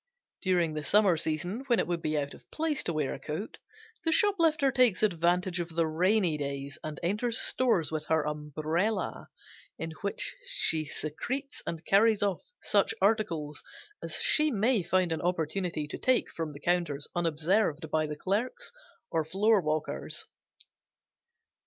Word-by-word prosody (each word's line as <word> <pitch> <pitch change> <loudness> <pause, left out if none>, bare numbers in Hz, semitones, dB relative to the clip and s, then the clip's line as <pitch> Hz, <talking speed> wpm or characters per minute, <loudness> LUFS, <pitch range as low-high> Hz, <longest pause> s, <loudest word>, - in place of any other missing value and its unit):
During 175 -4 +1
the 155 - -3
summer 195 +3 +4
season 160 +7 -2
when 240 -3 +3
it 180 - +1
would 175 -1 -2
be 155 -1 -1
out 140 -1 -2
of - - -16
place 315 -2 -1
to 170 - -1
wear 150 -3 -1
a - - -7
coat, 160 +9 -6 0.4
the 325 - +1
shoplifter 325 -7 +3
takes 245 -6 +3
advantage 180 -1 +1
of 170 -1 -3
the 165 -1 +2
rainy 175 0 +2
days 140 +1 -5
and 155 -2 -6
enters 210 +7 0
stores 230 -12 +2
with 155 -1 -3
her 160 -1 +2
umbrella, 155 +7 -2 0.5
in 165 0 -5
which 200 0 -2
she 485 - +3
secretes 250 - -4
and 165 0 -5
carries 210 +1 +4
off 200 -3 0 0.2
such 440 - +2
articles 165 -9 0 0.4
as - - -3
she 305 0 +4
may 225 -2 +2
find 180 0 +1
an 160 - -1
opportunity 175 -2 -1
to - - -6
take 255 -1 +2
from 165 -2 -4
the 140 - -10
counters 170 -4 0
unobserved 165 0 0
by 155 -1 +1
the 150 0 -5
clerks 235 - -2 0.4
or 165 -1 +1
floorwalkers. 180 -3 0
175 Hz, 150 wpm, -29 LUFS, 155-215 Hz, 0.5 s, summer